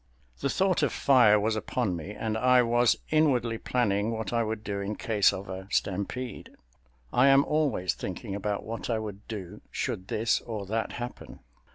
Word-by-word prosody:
The 140 - -1
thought 190 0 +2
of 145 - +2
fire 120 -6 +5
was 110 +2 0
upon 110 -3 -1
me 85 +3 -6
and 110 +1 -3
I 125 +2 +4
was 120 0 +3 0.2
inwardly 125 -8 +2
planning 105 -4 0
what 110 -1 -3
I 115 - +2
would 110 -1 -3
do 100 -1 -3
in 100 +2 -3
case 105 -2 +3
of 95 - -6
a 95 0 -7
stampede. 100 +7 -2 0.6
I 130 +2 +5
am 135 +1 +6
always 145 - +1
thinking 95 +3 -6
about 100 0 -2
what 115 +2 -5
I 115 - +1
would 105 -2 -7
do 100 -6 -7
should 95 - -3
this 115 +1 +1
or 110 -4 -5
that 110 +3 -2
happen. 120 0 -7
110 Hz, 180 wpm, -28 LUFS, 100-125 Hz, 0.6 s, am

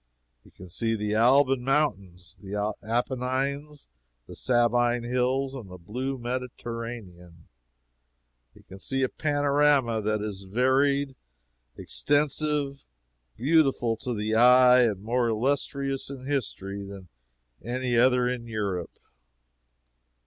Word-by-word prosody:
He - - -19
can 90 - -13
see 115 +6 -1
the 105 -1 -2
Alban 130 +3 +4
Mountains, 100 - -1
the 105 +1 -3
Appenines, 130 +5 -2 0.4
the - - -11
Sabine 120 -1 +1
Hills, 130 +2 0
and 120 -8 -8
the 90 - -10
blue 125 +10 -4
Mediterranean. 115 -8 -7 1.1
He - - -18
can 95 - -13
see 135 +6 -2
a 130 - +1
panorama 145 -5 +2
that 110 0 0
is 105 -2 -5
varied, 135 +6 +1 0.6
extensive, 145 -1 0 0.5
beautiful 135 -4 +2
to 125 +1 -4
the 105 +1 -2
eye, 125 +2 +7
and 105 -5 0
more 120 +2 0
illustrious 135 +3 -1
in 135 -2 -8
history 100 -8 -3
than 100 -2 -10 0.6
any 125 +1 -2
other 125 +1 +4
in 125 -1 -3
Europe. 100 -6 -4
125 Hz, 110 wpm, -26 LUFS, 105-135 Hz, 1.1 s, eye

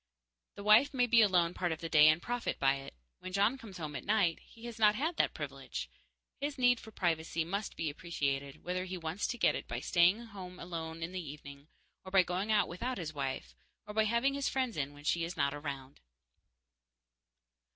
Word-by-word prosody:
The 200 - -8
wife 220 +7 +6
may 250 -1 +4
be 235 -1 +5
alone 180 -5 +3
part 175 -2 -1
of 160 - -3
the 165 - -4
day 155 -2 +7
and 155 +1 +5
profit 240 +6 -3
by 135 0 +3
it. 135 - -10 0.2
When 185 - -7
John 200 +6 +3
comes 205 -6 -10
home 155 -4 -5
at - - -5
night, 200 -6 +2
he 230 +1 -15
has 235 -1 -7
not 210 -1 +5
had 315 +8 -1
that - - +2
privilege. - - -6 0.5
His 285 0 -3
need 245 -2 +4
for 220 - -11
privacy 165 -4 -1
must 200 +5 -3
be 165 - -2
appreciated, 145 -3 -3
whether 185 +1 -2
he 185 0 -5
wants 165 +3 -2
to 245 - -3
get - - +4
it - - -5
by - - -3
staying 180 +4 +4
at 235 - -10
home 185 -3 -9
alone 165 -1 -5
in 165 - -4
the 185 -1 -4
evening, 140 -2 -10 0.4
or 190 - -9
by 190 -1 +6
going 185 +4 -2
out 210 -1 +4
without 240 +9 -3
his 155 -3 -5
wife, 135 - -4 0.3
or 210 - -8
by 220 0 +3
having 235 +5 +2
his 280 0 0
friends 260 -4 -1
in 145 -1 -2
when 145 - -13
she 170 +2 +1
is 170 +1 -5
not 140 -1 +1
around. 140 -2 -6
180 Hz, 215 wpm, -33 LUFS, 155-220 Hz, 0.5 s, day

